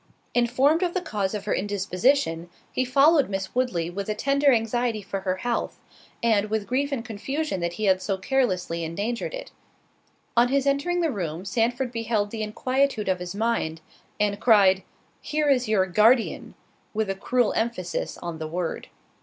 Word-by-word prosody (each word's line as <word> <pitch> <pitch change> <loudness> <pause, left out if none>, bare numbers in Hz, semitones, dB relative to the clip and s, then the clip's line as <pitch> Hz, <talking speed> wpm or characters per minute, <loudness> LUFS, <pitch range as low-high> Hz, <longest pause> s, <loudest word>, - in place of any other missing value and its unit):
Informed 260 +7 +3
of 355 -1 0
the - - +2
cause 210 - -2
of 205 - -5
her 210 - 0
indisposition, 195 -2 0 0.2
he 255 - 0
followed 275 +3 +4
Miss 195 -1 -4
Woodley 240 -10 0
with 200 +3 -5
a 215 - 0
tender 280 +4 +3
anxiety 230 -1 0
for 195 0 -4
her 185 -1 -1
health, 235 +5 -3 0.4
and 215 -3 +2
with 215 -1 -1
grief 280 +5 -1
and 245 -4 -3
confusion 270 +2 -3
that 170 0 -2
he 215 +4 -3
had 190 -1 +3
so 195 0 -1
carelessly 185 -7 0
endangered 210 - -3
it. - - -8 0.8
On 235 +1 +5
his 275 +1 +1
entering 285 +6 +1
the 325 -3 +1
room 175 - -4
Sandford 240 +5 0
beheld 225 -3 -1
the 225 - -4
inquietude 255 +1 0
of 185 -1 +1
his 180 +1 -6
mind, 205 -8 -1 0.4
and 205 -1 +1
cried, 195 -5 +5 0.4
"Here 300 -1 0
is 250 -3 +2
your 205 -3 +3
Guardian," 220 +6 +2 0.4
with 220 -1 0
a 195 - 0
cruel 245 +4 +1
emphasis 185 -7 -2
on 170 -2 -6
the 160 - -4
word. 170 +1 -3
220 Hz, 170 wpm, -25 LUFS, 190-255 Hz, 0.8 s, On